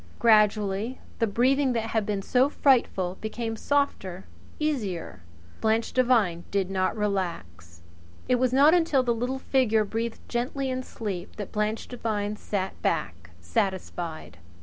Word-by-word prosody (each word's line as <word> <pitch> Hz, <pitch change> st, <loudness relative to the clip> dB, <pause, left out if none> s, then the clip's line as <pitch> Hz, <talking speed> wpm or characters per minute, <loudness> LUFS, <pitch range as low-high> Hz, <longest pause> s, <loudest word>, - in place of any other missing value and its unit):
Gradually 210 Hz, +1 st, +3 dB, 0.2 s
the 230 Hz, -, +2 dB
breathing 260 Hz, +5 st, +2 dB
that 225 Hz, -1 st, -2 dB
had 220 Hz, -2 st, 0 dB
been 200 Hz, -2 st, -1 dB
so 255 Hz, +6 st, +3 dB
frightful 215 Hz, -11 st, +2 dB
became 225 Hz, +1 st, -3 dB
softer, 215 Hz, -9 st, -1 dB, 0.3 s
easier. 205 Hz, -, -2 dB, 0.4 s
Blanche 220 Hz, +1 st, +1 dB
Devine 225 Hz, -10 st, +2 dB
did 195 Hz, -2 st, -1 dB
not 190 Hz, +3 st, 0 dB
relax. 95 Hz, -, -3 dB, 0.4 s
It 250 Hz, -, +3 dB
was 255 Hz, -1 st, +2 dB
not 280 Hz, +5 st, +6 dB
until 325 Hz, -7 st, +3 dB
the 240 Hz, -1 st, +1 dB
little 245 Hz, +3 st, -2 dB
figure 250 Hz, -5 st, +2 dB
breathed 225 Hz, +2 st, -4 dB
gently 260 Hz, +3 st, -2 dB
in 255 Hz, 0 st, -2 dB
sleep 200 Hz, -7 st, -6 dB
that 205 Hz, -3 st, -6 dB
Blanche 210 Hz, +1 st, -1 dB
Devine 215 Hz, -4 st, -2 dB
sat 195 Hz, -2 st, -4 dB
back 85 Hz, 0 st, -2 dB
satisfied. 175 Hz, -, -3 dB
220 Hz, 135 wpm, -26 LUFS, 190-250 Hz, 0.4 s, not